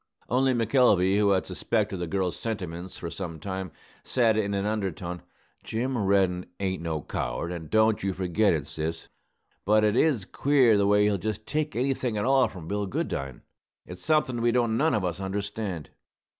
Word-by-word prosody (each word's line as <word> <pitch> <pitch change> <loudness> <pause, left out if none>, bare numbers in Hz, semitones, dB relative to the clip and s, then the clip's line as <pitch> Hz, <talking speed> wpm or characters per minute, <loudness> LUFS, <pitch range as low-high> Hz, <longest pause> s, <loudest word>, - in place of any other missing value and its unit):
Only 130 +1 +2
McElvey, 105 -5 +3
who 105 -1 +3
had 95 -2 +2
suspected 100 +2 -1
the 90 -1 -3
girl's 95 0 -1
sentiments 95 -5 -5
for 85 - -6
some 85 -3 -6
time, 95 0 -5 0.3
said 115 -4 +2
in 100 -2 0
an 100 0 -1
undertone, 95 -4 -3 0.4
"Jim 125 +4 -2
Reddin 95 -4 +1
ain't 95 -3 -2
no 80 -3 -3
coward, - - -3
and 80 -3 -6
don't 110 0 +3
you 95 - 0
forget 95 +3 +1
it, 75 -3 -1
sis. 80 +2 -5 0.5
But 105 +1 +4
it 105 0 +3
is 130 -8 +2
queer 130 -4 +3
the 100 -1 +3
way 105 0 +4
he'll 105 -2 +2
just 110 +2 -4
take 150 0 -2
anything 125 -2 0
at 105 - 0
all 135 0 +4
from 85 -4 -10
Bill 100 +1 -2
Goodine. 70 -7 -3 0.4
It's 90 0 -9
somethin' 150 -6 +1
we 120 0 +3
don't 115 -2 +1
none 155 +4 +2
of 100 -3 0
us 90 0 -3
understand." 100 -3 -4
100 Hz, 180 wpm, -27 LUFS, 90-115 Hz, 0.5 s, But